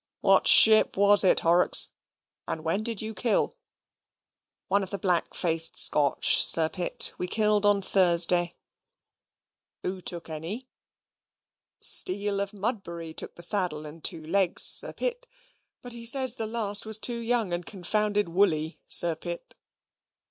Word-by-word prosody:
What - - +1
SHIP 220 -2 +6
was 205 +1 +5
it, 185 - +1
Horrocks, 175 +2 +2 0.6
and 160 - -6
when 165 +6 -3
did 225 -2 -6
you 220 +1 -8
kill?" 220 - -3 1.1
"One 200 +2 -1
of 190 - -7
the 200 - -6
black 180 -2 -3
faced 165 -2 +2
Scotch, 145 -2 +4
Sir 160 -1 +4
Pitt: 180 0 -1
we 180 - -5
killed 210 +1 -1
on 200 -1 0
Thursday." 175 -2 +1 1.3
"Who 185 0 -6
took 170 -1 -2
any?" 165 +11 -9 1.1
"Steel, 200 +2 +1
of 200 0 -5
Mudbury, 195 -7 -7
took - - -6
the 175 - 0
saddle 175 -5 -1
and 150 +2 -14
two 165 -4 -2
legs, 185 +2 -1
Sir - - +5
Pitt; - - -6 0.6
but 245 -1 -8
he 235 -1 -10
says 260 +1 +4
the 225 -3 -6
last 215 -3 -1
was 220 -1 -1
too 235 +1 -4
young 230 -5 -3
and 175 0 -4
confounded 205 +2 -4
woolly, 165 -3 -2
Sir 170 -2 +4
Pitt." 170 +2 -10
195 Hz, 145 wpm, -24 LUFS, 170-215 Hz, 1.3 s, SHIP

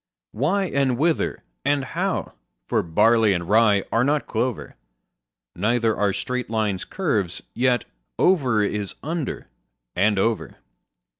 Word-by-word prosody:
Why, 160 - 0
and 135 -8 0
whither, 160 +4 0 0.2
and 140 -2 +1
how? - - -2 0.3
for - - +1
barley 110 +5 +3
and 85 -2 -3
rye 105 -1 +4
are 115 - +3
not 145 +2 +1
clover: 120 +1 -3 0.8
Neither 115 +3 +1
are 100 -1 +1
straight 125 +3 -3
lines 110 -4 -1
curves: 110 - -1
yet 125 0 +1 0.3
over 130 - +3
is 100 -1 -2
under 160 -2 -4 0.5
and 100 +3 +2
over. 110 +3 0
115 Hz, 125 wpm, -23 LUFS, 105-135 Hz, 0.8 s, rye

